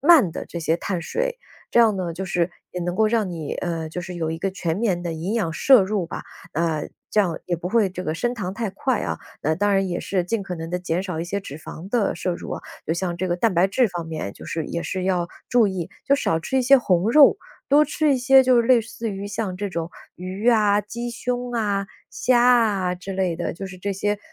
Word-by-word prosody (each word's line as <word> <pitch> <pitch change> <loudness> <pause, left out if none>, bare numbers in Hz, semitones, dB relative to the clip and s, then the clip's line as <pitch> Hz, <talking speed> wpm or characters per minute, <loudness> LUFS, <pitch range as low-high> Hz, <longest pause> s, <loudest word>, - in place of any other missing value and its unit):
慢 285 - +6
的 - - -5
这 170 - -6
些 160 +1 +1
碳 180 0 -3
水， - - -2 0.3
这 - - +3
样 220 -4 +4
呢， 175 -3 -2
就 190 +3 -5
是 175 -1 0 0.2
也 180 - -4
能 175 +1 -2
够 220 - +4
让 215 -4 +1
你， 160 -4 -4
呃， 165 -2 -3
就 170 +3 -5
是 180 +1 -7
有 160 -2 -2
一 165 - -3
个 195 +3 -1
全面 185 +1 -1
的 170 -2 -3
营 165 +5 -3
养 180 -8 0
摄 260 +4 +6
入 195 -1 -1
吧。 - - -7 0.3
呃， 160 -2 0 0.2
这 215 - +4
样 175 -5 0
也 175 - 0
不 175 +2 -5
会 220 -1 +3
这 185 0 -6
个 155 - -1
升 240 +8 -1
糖 190 -5 -4
太 225 -2 -2
快 240 +5 -1
啊， - - -2 0.3
那 155 +2 +1
当 205 +3 +1
然 195 -1 +2
也 175 - -2
是 185 -3 -1
尽 210 +2 -1
可 185 -2 -5
能 165 0 -6
地 180 - -1
减 175 0 -1
少 180 -5 -4
一 165 - -2
些 200 +3 -3
脂 145 -6 -8
肪 160 +3 -9
的 235 -4 +1
摄 180 - -1
入 - - -8
啊。 - - -5 0.2
就 160 - +1
像 175 0 -2
这 185 +1 -2
个 175 - 0
蛋 205 0 +1
白 175 +3 +4
质 245 +5 +3
方 175 -3 -5
面， 155 -11 -4
就 - - -13
是 165 -2 -3
也 170 - -3
是 185 -1 -3
要 180 -2 0 0.2
注 240 -3 +4
意。 185 -3 -4 0.2
就 280 - +4
少 165 - 0
吃 265 +10 0
一 255 - +2
些 275 +3 +7
红 190 -1 +2
肉， 300 -2 +8 0.3
多 295 +2 +6
吃 305 -1 +1
一 260 - 0
些 265 +1 +6
就 255 -1 +4
是 - - +1
类 250 -2 +6
似 225 +1 -6
于 195 +1 -5
像 195 -3 -3
这 200 +1 -3
种 170 -2 -3 0.3
鱼 185 +6 -2
啊、 210 -3 +4
鸡 235 +4 -5
胸 245 +1 -3
啊、 205 -4 0 0.2
虾 245 -2 +2
啊 215 -7 +3
之 190 +2 -7
类 185 -3 0
的， 175 - -2
就 195 +3 -6
是 185 -1 -10
这 200 +2 -2
些 205 +1 -1
190 Hz, 275 characters per minute, -23 LUFS, 175-230 Hz, 0.3 s, 肉